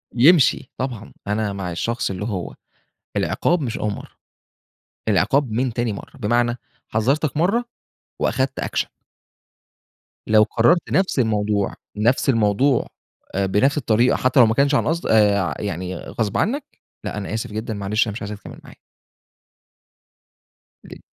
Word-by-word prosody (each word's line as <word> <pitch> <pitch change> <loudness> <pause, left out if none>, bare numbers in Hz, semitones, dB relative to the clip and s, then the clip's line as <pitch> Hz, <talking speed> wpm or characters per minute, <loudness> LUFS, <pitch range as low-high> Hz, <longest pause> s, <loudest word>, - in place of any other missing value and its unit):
يمشي 135 0 +5
طبعًا، 120 -4 -5
أنا 105 0 -1
مع 95 -3 -4
الشخص 115 +8 -2
اللي 95 +2 -4
هو 95 -6 -4 0.6
العقاب 175 -1 +1
مش 120 -5 -3
أول 105 -1 -1
مرَّة، - - -8 1.0
العقاب 110 +7 +2
من 120 +3 0
تاني 120 -2 -1
مرَّة، 100 - -10
بمعنى، 120 +1 +1 0.3
حذّرتك 135 +8 0
مرَّة 200 +10 +2 0.6
وأخدْت 130 0 0
أكشن. - - -1 1.4
لو 110 0 +5
كرّرت 120 +13 +2
نفْس 190 -6 +2
الموضوع، 105 -3 +1 0.2
نفْس 120 +6 +2
الموضوع 115 +3 +2 0.5
آآ، 100 - +1
بنفْس 105 +10 +2
الطريقة 120 -2 +3
حتى 130 +1 +2
لو 120 - +9
ما 110 - +2
كانش 140 +3 +3
عن - - +1
قصد 165 +2 -1
آآ، 105 -2 +4
ع 90 - -1
يعني 95 -2 -4
غصْب 105 +1 -3
عنّك 275 +8 0 0.4
لأ، - - -4
أنا 105 0 -4
آسف 110 -1 -3
جدًا، 110 +1 -4
معلش، 105 +3 0
أنا - - -2
مش - - -7
عايزك 100 0 -5
تكمّل - - -11
معايا. - - -14 2.1
ليه؟ - - -11
115 Hz, 145 wpm, -22 LUFS, 105-130 Hz, 2.1 s, لو